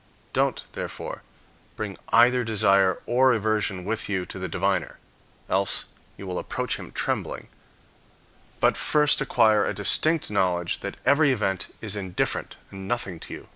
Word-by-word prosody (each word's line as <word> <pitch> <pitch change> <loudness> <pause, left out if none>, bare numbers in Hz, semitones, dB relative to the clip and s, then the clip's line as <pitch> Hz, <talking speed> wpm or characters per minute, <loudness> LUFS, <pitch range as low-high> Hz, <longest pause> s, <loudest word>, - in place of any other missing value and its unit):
Don't, - - +1
therefore, - - -6 0.5
bring 105 -3 -4
either 125 +2 +5
desire 100 -4 +3
or 130 +1 +4
aversion 105 -4 0
with 110 +1 -2
you 95 -3 -1
to 95 - -7
the 95 - -3
diviner 80 - -1 0.5
(else 95 0 +1 0.3
you 100 - -8
will 90 -1 -3
approach - - -2
him - - -9
trembling), - - -2 1.1
but - - +3
first 150 0 +3
acquire 110 -5 +4
a 105 - -2
distinct 155 - +2
knowledge 90 -3 0
that 100 - -6
every 140 +1 +5
event 100 -6 -1
is 105 -2 -3
indifferent 95 -3 -2 0.2
and 95 0 -8
nothing 100 -7 -2
to - - -9
you. - - -12
105 Hz, 145 wpm, -25 LUFS, 95-120 Hz, 1.1 s, either